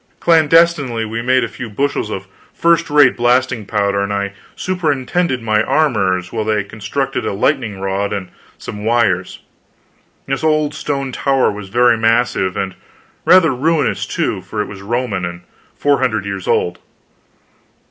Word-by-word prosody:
Clandestinely 160 Hz, -7 st, +3 dB
we 110 Hz, +1 st, -4 dB
made 130 Hz, +1 st, +2 dB
a -, -, -1 dB
few 120 Hz, +1 st, -8 dB
bushels 135 Hz, 0 st, -1 dB
of 95 Hz, -2 st, -5 dB, 0.3 s
first 170 Hz, 0 st, +2 dB
rate 145 Hz, -3 st, +5 dB
blasting 120 Hz, -3 st, +1 dB
powder, 100 Hz, -1 st, 0 dB
and 100 Hz, +1 st, -2 dB
I 100 Hz, 0 st, -2 dB, 0.2 s
superintended 155 Hz, -5 st, -1 dB
my 110 Hz, -1 st, +2 dB
armorers 95 Hz, -, +1 dB
while 110 Hz, -2 st, -1 dB
they 105 Hz, -1 st, 0 dB
constructed 120 Hz, +7 st, -3 dB
a -, -, -2 dB
lightning 110 Hz, -2 st, 0 dB
rod 95 Hz, +1 st, -2 dB
and 95 Hz, -3 st, -4 dB, 0.3 s
some 105 Hz, 0 st, -8 dB
wires. 105 Hz, -5 st, 0 dB, 0.8 s
This 135 Hz, +2 st, -3 dB
old 155 Hz, -1 st, +2 dB
stone 140 Hz, -2 st, -3 dB
tower 135 Hz, +1 st, +1 dB
was 100 Hz, -2 st, -8 dB
very 120 Hz, +1 st, +3 dB
massive 115 Hz, -4 st, +1 dB
and 95 Hz, -1 st, -2 dB, 0.5 s
rather 170 Hz, -6 st, +6 dB
ruinous, 155 Hz, +4 st, 0 dB
too, -, -, -2 dB
for 95 Hz, +3 st, -7 dB
it 105 Hz, -, 0 dB
was 95 Hz, -1 st, -10 dB
Roman, 115 Hz, -2 st, -2 dB
and 85 Hz, 0 st, -5 dB, 0.4 s
four 145 Hz, -1 st, +2 dB
hundred 110 Hz, -6 st, 0 dB
years 95 Hz, -2 st, -5 dB
old. 90 Hz, 0 st, 0 dB
115 Hz, 150 wpm, -17 LUFS, 100-140 Hz, 0.8 s, rather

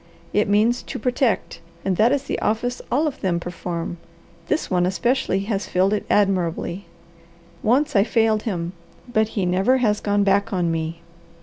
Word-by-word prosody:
It 210 Hz, 0 st, +2 dB
means 220 Hz, +4 st, +3 dB
'to -, -, -6 dB
protect' 245 Hz, -6 st, 0 dB, 0.3 s
and 190 Hz, -1 st, +1 dB
that 220 Hz, +6 st, +4 dB
is 280 Hz, -1 st, +1 dB
the -, -, -3 dB
office 245 Hz, +3 st, -1 dB
all 285 Hz, +6 st, +2 dB
of 300 Hz, -, -3 dB
them 180 Hz, -3 st, 0 dB
perform; 175 Hz, 0 st, -5 dB, 0.5 s
this 310 Hz, -, 0 dB
one 180 Hz, -1 st, +1 dB
especially 195 Hz, 0 st, 0 dB
has 200 Hz, -1 st, -2 dB
filled 190 Hz, +3 st, +2 dB
it 210 Hz, -, -2 dB
admirably. 185 Hz, -1 st, +1 dB, 0.8 s
Once 280 Hz, +6 st, +2 dB
I 200 Hz, -, +6 dB
failed 220 Hz, -1 st, +2 dB
him, 175 Hz, -5 st, -3 dB, 0.3 s
but 220 Hz, -3 st, +1 dB
he 195 Hz, -, +1 dB
never 190 Hz, +9 st, +3 dB
has 215 Hz, -5 st, +1 dB
gone 205 Hz, 0 st, +1 dB
back 200 Hz, +3 st, +2 dB
on 175 Hz, -4 st, 0 dB
me. 165 Hz, +1 st, -3 dB
205 Hz, 170 wpm, -22 LUFS, 180-235 Hz, 0.8 s, I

